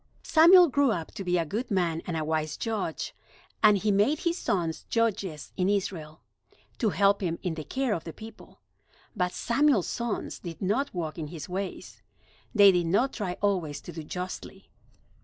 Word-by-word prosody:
Samuel 345 +3 +7
grew 285 -1 +2
up 170 -8 -2
to 195 - -6
be 180 -1 +1
a 165 - 0
good 220 - -3
man 175 -5 0
and 170 -2 -2
a 155 - -2
wise 155 -1 -1
Judge, 210 -8 -3 0.5
and 210 -2 +6
he 210 +2 0
made 210 +10 +2
his 340 0 0
sons 175 - -2
Judges 200 -9 -1
in 185 0 +1
Israel, 170 -6 -3 0.6
to 225 - +2
help 200 +1 +3
him 170 -3 -1
in 180 -3 -1
the 160 -1 -6
care 260 - -1
of 165 - -3
the 165 - -7
people. 220 +6 -13 0.5
But 180 0 0
Samuel's 260 - +2
sons 235 -2 -3
did 165 -3 -8
not 215 +9 0
walk 165 -2 -4
in 155 - -4
his 160 0 -8
ways. 190 +1 -6 0.5
They 200 -2 +8
did 175 -2 +1
not 235 +10 +2
try 190 -5 -4
always 180 -8 0
to - - -9
do 165 -1 -7
justly. 180 +4 -7
190 Hz, 180 wpm, -27 LUFS, 165-225 Hz, 0.6 s, They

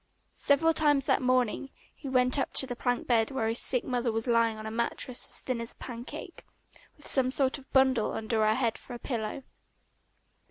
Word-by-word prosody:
Several 305 +3 +3
times 290 -4 +2
that - - +2
morning 255 0 0 0.2
he 280 - -8
went 255 +1 +3
up - - -2
to - - +4
the 245 -2 -5
plank 245 0 -1
bed 225 -3 +2
where 265 -5 -2
his 225 +2 +1
sick 250 -2 +2
mother 245 -2 -1
was 225 0 -2
lying 230 -2 +2
on 215 - -8
a 220 - -5
mattress 235 +2 -2
as - - +3
thin 250 -3 -2
as 230 - -3
a - - -33
pancake, 240 -1 -8 0.5
with 295 - -13
some 255 -2 +2
sort 270 +1 0
of 270 - -19
bundle 265 -4 +3
under 220 0 -1
her 215 0 +3
head 235 -3 -1
for 245 - -9
a - - -6
pillow. 235 +1 -4
250 Hz, 205 wpm, -29 LUFS, 230-265 Hz, 0.5 s, to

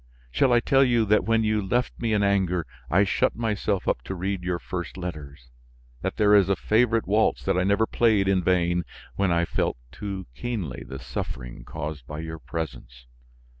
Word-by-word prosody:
Shall 130 - +3
I 120 - +6
tell 135 +2 +4
you 120 -4 +3
that 105 +1 +3
when 115 0 +2
you 110 0 +1
left 120 +6 0
me 115 -2 -1
in 105 -1 +2
anger 95 -4 +1 0.2
I 95 +6 +4
shut 100 - +1
myself 105 -4 -1
up - - +1
to 95 - -4
read 95 +1 -2
your 90 -1 -1
first 85 0 -6
letters; 70 -8 -7 0.5
that - - -3
there 105 -1 +4
is 100 -2 +5
a 100 - +3
favorite 115 +2 +2
waltz 105 +3 +2
that - - +1
I 90 - +2
never 100 +3 +3
played 110 -4 +2
in 95 -2 +2
vain 90 -1 +2 0.3
when 100 -2 +1
I 85 0 +2
felt - - -1
too 100 -3 -5
keenly 90 - -4
the 65 - -6
suffering - - -6
caused 75 -4 -6
by 75 - -6
your 80 0 -6
presence? 65 -7 -6
95 Hz, 190 wpm, -25 LUFS, 80-110 Hz, 0.5 s, I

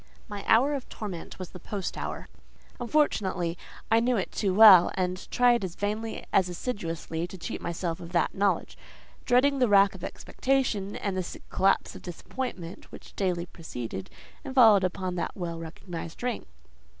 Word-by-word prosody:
My 205 -3 -6
hour 265 +6 +5
of 275 -3 -5
torment 195 -7 -7
was 185 -2 -7
the 180 - -10
post 195 +1 -4
hour. - - -5 0.5
Unfortunately, 200 - +1 0.4
I 225 - +6
knew 240 +1 +2
it 190 - -2
too 200 -3 0
well, 190 -3 +9
and 185 0 -2
tried 245 -2 +3
as 180 -2 -4
vainly 215 +2 -3
as 185 -2 +4
assiduously 170 -4 -4
to 190 - -10
cheat 175 - -5
myself 170 -1 -3
of 170 0 -9
that 170 -3 +1
knowledge; 200 0 0 0.5
dreading 270 +3 +3
the 250 - +4
rack 200 -1 +6
of 185 -2 -11
expectation, 245 -7 -1
and 200 -2 -3
the 185 - 0
sick 175 - -9
collapse 195 +1 +2
of - - -9
disappointment 180 0 -6
which - - -13
daily 180 -3 -1
preceded 120 - -7 0.3
and 270 -2 -7
followed 220 -6 +7
upon 185 0 -2
that 170 - -3
well 170 -3 -4
recognised 165 +2 -8
ring. 245 -2 -2
190 Hz, 165 wpm, -28 LUFS, 175-225 Hz, 0.5 s, well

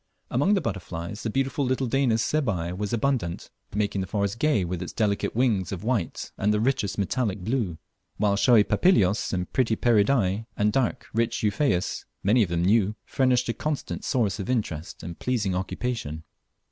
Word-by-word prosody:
Among 145 - +3
butterflies 95 - -4
the 115 - -2
beautiful 135 +4 0
little 130 +1 0
Danis 120 -3 +2
sebae 100 - 0
was 105 +1 -3
abundant, 115 -7 -1 0.2
making 100 -2 0
the 95 - -3
forests 100 +1 -1
gay 130 -6 +2
with 90 0 -4
its 90 - -5
delicate 105 -2 0
wings 110 -8 +1
of 95 -1 -5
white 110 -7 -2
and 105 +2 +2
the 105 - +2
richest 120 -3 0
metallic 100 0 -1
blue; 110 -6 -1 0.4
while 105 -1 +2
showy 115 +1 +5
Papilios, 105 - +2
and 90 -1 -3
pretty 115 -4 +2
Pieridae, 110 -2 +2
and 105 0 +2
dark, 130 -3 0
rich 115 0 0
Euphaeas, 105 -3 0 0.2
many 110 +5 +4
of 100 - +2
them 85 0 0
new, 105 +1 +3
furnished 125 -2 +2
a - - +1
constant 150 +2 -3
source 110 -6 0
of 100 - -4
interest 95 -11 -3
and 85 0 -7
pleasing 110 -7 0
occupation. 95 -4 -3
105 Hz, 170 wpm, -26 LUFS, 95-125 Hz, 0.4 s, showy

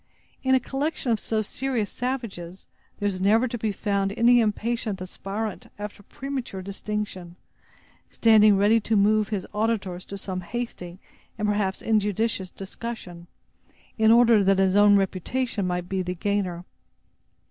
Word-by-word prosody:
In 260 0 +3
a - - +4
collection 270 0 -2
of 225 - +2
so 215 +1 -1
serious 245 -1 -2
savages, 220 -9 -5 0.3
there 205 - -4
is 185 -2 -2
never 220 +6 +4
to 240 - -5
be 220 -2 -1
found 200 -1 -1
any 240 +1 +6
impatient 220 -1 -1
aspirant 195 +3 -5
after 205 0 -7
premature 255 -4 -6
distinction, 200 -3 -5 0.7
standing 215 -3 +5
ready 210 +3 +4
to 220 +1 -1
move 210 +1 +3
his 205 -4 -2
auditors 205 -5 -1
to 200 - -7
some 185 -1 -4
hasty, 180 -3 -6 0.4
and, 210 -1 -1
perhaps, 205 -2 -1
injudicious 210 -2 0
discussion, 190 -4 -8 0.7
in 220 -1 +3
order 230 -3 +6
that 195 0 +3
his 190 0 +3
own 205 0 +7
reputation 200 +3 -1
may 180 0 -1
be 185 +2 -3
the 180 0 -3
gainer. 185 -2 -2
205 Hz, 145 wpm, -25 LUFS, 190-230 Hz, 0.7 s, own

